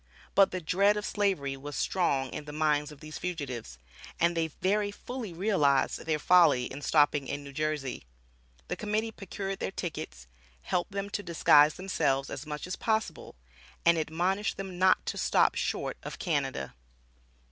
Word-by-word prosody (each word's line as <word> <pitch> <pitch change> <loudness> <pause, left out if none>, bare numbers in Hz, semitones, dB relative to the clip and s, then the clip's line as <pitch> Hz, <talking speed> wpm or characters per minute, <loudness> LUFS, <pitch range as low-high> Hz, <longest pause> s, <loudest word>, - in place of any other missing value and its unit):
But 195 0 +6
the 185 - -3
dread 200 +6 +3
of 210 - -3
Slavery 190 -10 0
was 145 +2 -8
strong 140 -8 0
in 150 - -6
the 150 - -7
minds 150 -1 +1
of 150 -1 -14
these 155 -1 -8
fugitives, 130 - -5 0.4
and 170 0 +3
they 165 -1 +1
very 205 +6 0
fully 235 +1 -6
realized 165 -7 +1
their 155 -1 +2
folly 160 -5 +5
in 135 +3 -7
stopping 145 -2 +3
in 145 +2 -4
New 140 0 -10
Jersey. 150 - -3 0.6
The - - -2
Committee 215 +1 -1
procured 195 -1 -5
their - - -2
tickets, 65 - -6 0.4
helped 175 - -1
them 200 +1 -4
to 205 - -2
disguise 155 -4 +5
themselves 140 -8 0
as 150 - -6
much 150 -1 -5
as 180 - -4
possible, 220 -1 -2 0.5
and 170 0 +6
admonished 175 +6 -1
them 190 -2 -6
not 185 0 +4
to - - -3
stop - - +3
short - - -2
of - - -7
Canada. 70 0 -2
165 Hz, 165 wpm, -29 LUFS, 145-195 Hz, 0.6 s, But